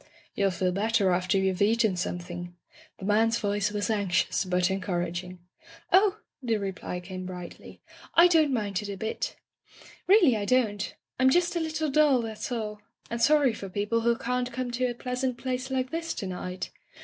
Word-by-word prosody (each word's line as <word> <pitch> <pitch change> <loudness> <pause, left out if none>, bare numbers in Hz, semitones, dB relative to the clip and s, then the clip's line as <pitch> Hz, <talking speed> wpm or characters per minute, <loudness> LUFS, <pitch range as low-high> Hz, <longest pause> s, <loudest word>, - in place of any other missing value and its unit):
'' - - -31
"You'll 200 -1 +2
feel 185 0 0
better 205 0 +2
after 180 +1 +1
you've 190 -1 0
eaten 220 -1 +3
something." 175 0 -5 0.4
The 190 - -8
man's 225 +3 +3
voice 205 -2 0
was 210 +2 -1
anxious, 200 -2 +1
but 180 0 +1
encouraging. 180 -1 -3 0.6
"Oh!" 395 +2 +5 0.2
the 230 -4 0
reply 190 -3 -4
came 185 +1 -7
brightly, 180 -2 -9 0.3
"I 340 +1 +8
don't 320 -4 +4
mind 205 -5 -1
it 205 - -6
a 200 - -5
bit. 220 +3 -3 0.7
Really, 360 - +6
I 205 -1 -2
don't. 210 -4 +1 0.2
I'm 260 0 +5
just 350 +5 +2
a - - +1
little 315 -2 -1
dull, 280 -4 +4
that's 220 +3 -5
all 210 -3 -4
— - - -28
^and 235 0 -2
sorry 285 -1 +4
for 195 -2 -7
people 210 +4 0
who 235 0 +2
can't 250 0 -2
come 250 0 -3
to 250 +1 0
a 240 - -3
pleasant 250 0 -2
place 255 +1 -3
like 260 0 -1
this 330 0 -3
to - - -4
night. 185 0 -5
220 Hz, 185 wpm, -27 LUFS, 190-255 Hz, 0.7 s, I